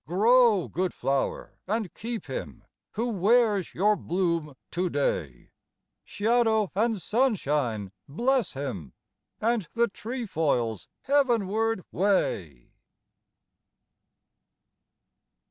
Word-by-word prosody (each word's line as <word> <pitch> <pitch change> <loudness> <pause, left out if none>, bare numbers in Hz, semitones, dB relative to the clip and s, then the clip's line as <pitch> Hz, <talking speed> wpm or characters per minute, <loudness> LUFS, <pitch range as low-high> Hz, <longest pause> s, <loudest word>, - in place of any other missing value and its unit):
Grow, 220 +2 +4
good 185 +1 -2
flower, 135 0 -2
and 215 -2 -2
keep 230 -2 -5
him 100 - -6 0.3
Who 230 +3 -1
wears 210 -1 +2
your 210 +4 +3
bloom 170 -6 -1 0.2
today, 140 - -2 0.5
Shadow 220 -1 +1
and 220 +1 +1
sunshine 150 - 0 0.2
bless 240 - 0
him, 125 - -5 0.5
And 225 -5 0
the 235 0 +3
trefoil's 160 - -2 0.2
heavenward 225 -6 +1
way. 95 - 0
195 Hz, 80 wpm, -27 LUFS, 145-230 Hz, 0.5 s, Grow